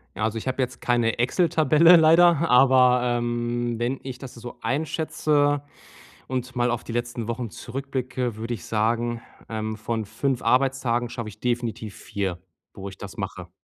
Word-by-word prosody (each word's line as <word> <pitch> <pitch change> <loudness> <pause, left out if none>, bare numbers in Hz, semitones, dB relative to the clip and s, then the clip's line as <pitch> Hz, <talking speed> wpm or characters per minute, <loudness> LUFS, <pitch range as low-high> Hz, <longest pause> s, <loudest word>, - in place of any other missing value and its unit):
Ja, 105 - -3
also 110 0 -2
ich 115 - -6
habe 130 +1 -1
jetzt 130 0 -3
keine 120 -2 +1
Exel-Tabelle 160 +5 +5
leider, 165 0 +5
aber, 125 -1 +5
ähm, 120 -1 -1
wenn 125 +3 -1
ich 130 -2 -7
das 130 -2 -9
so 120 +1 -9
einschätze 145 -1 0 0.6
und 130 -1 -4
mal 120 0 +2
auf 120 0 -3
die 115 - -7
letzten 120 -1 -3
Wochen 115 -1 -3
zurückblicke, 130 -1 -4
würde 115 +2 -4
ich 95 - -9
sagen, 115 +2 0 0.3
ähm, 110 -1 -3
von 110 0 -3
5 125 +4 -1
Arbeitstagen 125 -1 +1
schaffe 115 -3 -5
ich 100 - -11
definitiv 120 -4 -3
4, 95 -3 -4 0.3
wo 100 0 -7
ich 95 - -10
das - - -10
mache. - - -6
120 Hz, 165 wpm, -24 LUFS, 115-135 Hz, 0.6 s, Exel-Tabelle